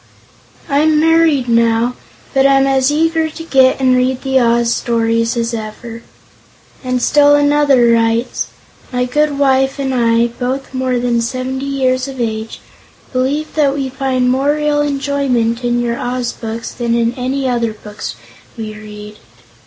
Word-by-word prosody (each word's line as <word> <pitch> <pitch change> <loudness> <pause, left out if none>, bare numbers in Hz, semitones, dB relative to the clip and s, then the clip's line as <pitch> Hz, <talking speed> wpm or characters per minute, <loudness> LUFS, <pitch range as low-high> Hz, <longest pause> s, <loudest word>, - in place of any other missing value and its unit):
I'm 300 +2 +2
married, 325 -5 +3
now, 230 +1 +2 0.4
but 270 -1 +4
am 275 0 +4
as 270 0 +2
eager 320 +1 +1
to 325 +1 -9
get 265 -5 +3
and 260 -1 +3
read 255 0 0
the 265 -1 +2
Oz 235 -1 +2
stories 230 0 0
as 235 0 -1
ever." 230 +1 -7 0.8
And 255 -1 -1
still 290 +3 +4
another 290 -3 +3
writes: 230 +1 0 0.4
"My 250 0 0
good 295 +3 0
wife 270 -1 +2
and 270 -1 -2
I, 230 -1 +2
both 250 +3 -4
more 255 -1 -1
than 240 -1 0
70 255 +2 -3
years 260 -1 0
of 265 -1 -8
age, 220 -1 -4 0.5
believe 275 +4 -1
that 285 -3 +1
we 275 -2 -2
find 260 -1 -1
more 275 +3 +1
real 300 -1 0
enjoyment 275 -5 -1
in 240 0 0
your 235 -1 -2
Oz 245 -1 -2
books 225 0 -6
than 235 -1 -2
in 235 0 +1
any 260 +2 -2
other 235 -2 0
books 210 -1 -8 0.4
we 215 -1 -6
read." 210 0 -11
255 Hz, 155 wpm, -15 LUFS, 235-275 Hz, 0.8 s, but